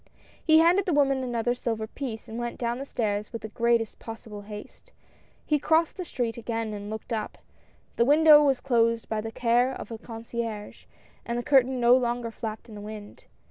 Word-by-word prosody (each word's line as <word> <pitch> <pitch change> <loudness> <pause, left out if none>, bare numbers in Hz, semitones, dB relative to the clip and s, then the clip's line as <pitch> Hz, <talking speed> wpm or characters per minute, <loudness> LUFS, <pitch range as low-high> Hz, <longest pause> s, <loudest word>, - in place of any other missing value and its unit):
He 315 -1 +6
handed 350 +4 +4
the 345 - +2
woman 275 -2 +3
another 240 -1 0
silver 225 -3 -3
piece, 225 -1 -6
and 225 +2 -6
went 240 0 -4
down 235 +1 -2
the 275 - -6
stairs 210 -5 -2
with 230 - -6
the 220 - -5
greatest 230 0 +1
possible 225 -2 -8
haste. 210 - -11 0.5
He 300 -1 +2
crossed 320 +3 +2
the 370 - -4
street 240 -7 -3
again 225 -1 -3
and 205 0 -6
looked 220 +2 -5
up; 220 -1 -3 0.6
the - - +5
window 300 +1 +7
was 275 -3 +2
closed 230 -3 +1
by 220 -1 -2
the 225 +1 -6
care 240 +2 +2
of - - -7
the 225 -1 -7
con 225 -1 -9
cierge, 230 -3 -5 0.4
and 235 0 -3
the 240 - -2
curtain 260 -1 +3
no 240 +1 +6
longer 240 -2 -1
flapped 220 0 -6
in 225 - -12
the 205 - -8
wind. 210 0 -9
235 Hz, 200 wpm, -27 LUFS, 220-260 Hz, 0.6 s, window